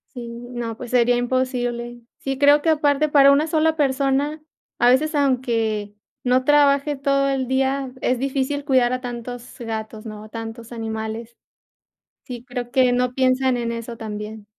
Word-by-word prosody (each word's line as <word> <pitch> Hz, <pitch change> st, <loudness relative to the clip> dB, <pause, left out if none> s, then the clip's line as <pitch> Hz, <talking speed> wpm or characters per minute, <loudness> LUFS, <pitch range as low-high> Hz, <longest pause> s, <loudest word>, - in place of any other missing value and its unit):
Sí, 245 Hz, -1 st, -6 dB
no, 235 Hz, -1 st, -6 dB
pues 240 Hz, 0 st, -8 dB
sería 245 Hz, -1 st, +3 dB
imposible, 245 Hz, -1 st, -2 dB, 0.2 s
sí, 270 Hz, -1 st, -3 dB
creo 285 Hz, +1 st, +5 dB
que -, -, -1 dB
aparte 300 Hz, -1 st, +3 dB
para 280 Hz, -1 st, +6 dB
una 290 Hz, +3 st, +3 dB
sola 320 Hz, 0 st, +1 dB
persona, 280 Hz, +1 st, 0 dB, 0.4 s
a 240 Hz, -, +5 dB
veces 305 Hz, +5 st, +2 dB
aunque 230 Hz, -7 st, 0 dB, 0.3 s
no 255 Hz, +1 st, +2 dB
trabaje 285 Hz, 0 st, +3 dB
todo 275 Hz, 0 st, +1 dB
el 270 Hz, -2 st, -1 dB
día, 265 Hz, 0 st, 0 dB
es 250 Hz, -, +1 dB
difícil 275 Hz, +2 st, -2 dB
cuidar 255 Hz, -4 st, +3 dB
a 255 Hz, -, -1 dB
tantos 245 Hz, 0 st, -7 dB
gatos, 220 Hz, -1 st, -5 dB
¿no?, 215 Hz, -1 st, -8 dB
a -, -, -12 dB
tantos 225 Hz, +1 st, -8 dB
animales 225 Hz, 0 st, -5 dB, 0.9 s
sí, 245 Hz, -2 st, -8 dB
creo 245 Hz, -1 st, -6 dB
que 255 Hz, -2 st, +4 dB
no 250 Hz, 0 st, 0 dB
piensan 260 Hz, 0 st, +2 dB
en 235 Hz, -1 st, -2 dB
eso 230 Hz, 0 st, -6 dB
también. 215 Hz, -1 st, -7 dB
250 Hz, 160 wpm, -22 LUFS, 235-275 Hz, 0.9 s, para